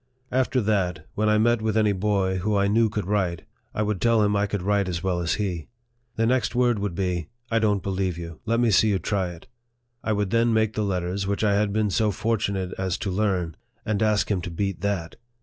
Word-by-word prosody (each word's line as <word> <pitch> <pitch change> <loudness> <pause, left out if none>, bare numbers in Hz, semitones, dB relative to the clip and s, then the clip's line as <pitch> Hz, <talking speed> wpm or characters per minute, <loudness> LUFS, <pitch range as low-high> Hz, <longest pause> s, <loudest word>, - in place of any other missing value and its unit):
After 130 0 +1
that, 95 -7 0
when 105 +1 +1
I 105 - +4
met 115 +1 +3
with 110 0 0
any 105 -1 +4
boy 95 -1 0
who 105 +3 0
I 100 0 +3
knew 110 +2 +3
could 105 -2 -3
write, 95 -4 0 0.3
I 105 - -1
would 105 -3 -2
tell 115 -1 +4
him 105 0 +2
I 100 0 +1
could 100 -2 -3
write 100 -1 +1
as 85 0 -3
well 90 -2 0
as 85 -3 0
he. 90 -7 -3 0.5
The 115 - +1
next 125 +1 +1
word 120 -3 +3
would 100 -4 -3
be, 90 -3 -1
" 120 0 -37
I 115 - +3
don't 105 -3 +1
believe 95 -3 -1
you. 85 -2 -8
Let 115 +1 +1
me 120 -2 +3
see 110 +2 +5
you 100 - +2
try 95 -1 -1
it." 85 -1 -11 0.6
I 110 - 0
would 100 -2 -1
then 115 0 +3
make 110 -1 +2
the 110 - -1
letters 95 -1 -1
which 100 +2 -1
I 105 -1 +3
had 100 0 +2
been 105 -1 +1
so 110 +1 +2
fortunate 100 -3 -1
as 95 -1 -1
to 95 - -3
learn, 90 -5 0 0.3
and 110 -2 -1
ask 105 -1 +2
him 95 -3 +1
to 85 - -5
beat 95 +2 -3
that. 100 -5 -2
100 Hz, 235 wpm, -25 LUFS, 95-110 Hz, 0.6 s, see